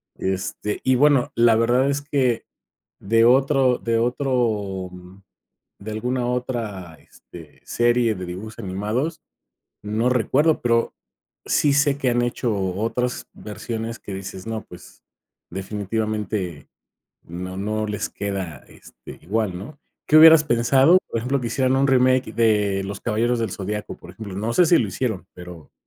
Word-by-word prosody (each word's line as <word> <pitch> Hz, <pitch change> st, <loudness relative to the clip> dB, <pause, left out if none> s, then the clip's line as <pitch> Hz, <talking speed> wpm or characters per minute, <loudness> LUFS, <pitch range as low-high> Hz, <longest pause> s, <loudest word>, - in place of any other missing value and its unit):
este, 95 Hz, +2 st, -3 dB
y 130 Hz, -, +4 dB
bueno, 140 Hz, -1 st, +3 dB
la 115 Hz, -1 st, +5 dB
verdad 120 Hz, +4 st, +2 dB
es 140 Hz, 0 st, -1 dB
que 130 Hz, -5 st, 0 dB, 0.6 s
de 115 Hz, +3 st, +3 dB
otro 130 Hz, 0 st, +4 dB
de 115 Hz, 0 st, 0 dB
otro, 115 Hz, -7 st, -1 dB
mm, 90 Hz, +2 st, -14 dB, 0.6 s
de 105 Hz, +2 st, -7 dB
alguna 125 Hz, +3 st, -2 dB
otra, 115 Hz, -8 st, -4 dB
este, 80 Hz, -4 st, -15 dB
serie 120 Hz, -1 st, +2 dB
de 90 Hz, -1 st, -6 dB
dibujos 100 Hz, +6 st, -8 dB
animados, 110 Hz, -, -3 dB, 0.6 s
no 110 Hz, +4 st, 0 dB
recuerdo, 140 Hz, +6 st, +2 dB
pero 115 Hz, -1 st, +1 dB, 0.5 s
sí 145 Hz, -2 st, +2 dB
sé 140 Hz, -1 st, +3 dB
que 130 Hz, -3 st, +1 dB
han 120 Hz, -, +1 dB
hecho 120 Hz, -1 st, -1 dB, 0.2 s
otras 125 Hz, +4 st, -2 dB
versiones 115 Hz, +2 st, -6 dB
que 100 Hz, -, -9 dB
dices, 95 Hz, 0 st, -8 dB
no, 110 Hz, -1 st, -4 dB
pues, -, -, -14 dB, 0.5 s
definitivamente 100 Hz, -2 st, -3 dB, 0.6 s
no 90 Hz, +2 st, -7 dB
no 110 Hz, +2 st, -2 dB
les 105 Hz, -1 st, -3 dB
queda, 95 Hz, -8 st, -5 dB
este, -, -, -14 dB
igual, 100 Hz, +1 st, -2 dB
¿no? 130 Hz, +11 st, -10 dB, 0.3 s
¿Qué 150 Hz, -, +3 dB
hubieras 160 Hz, 0 st, +9 dB
pensado? 135 Hz, +7 st, +4 dB
Por -, -, -2 dB
ejemplo, 130 Hz, +4 st, -1 dB
que 120 Hz, -, -2 dB
hicieran 130 Hz, +2 st, +1 dB
un 135 Hz, +1 st, +2 dB
remake 130 Hz, 0 st, +3 dB
de 105 Hz, -4 st, +2 dB
Los 100 Hz, +1 st, -6 dB
Caballeros 120 Hz, +2 st, 0 dB
del 115 Hz, -4 st, -2 dB
Zodiaco, 105 Hz, +2 st, -5 dB
por 85 Hz, -, -13 dB
ejemplo, 100 Hz, 0 st, -9 dB
no 110 Hz, +4 st, -2 dB
sé 180 Hz, -, +5 dB
si 170 Hz, +1 st, +5 dB
lo 110 Hz, -, 0 dB
hicieron, 110 Hz, 0 st, -3 dB
pero, 90 Hz, -3 st, -12 dB
115 Hz, 150 wpm, -22 LUFS, 100-125 Hz, 0.6 s, hubieras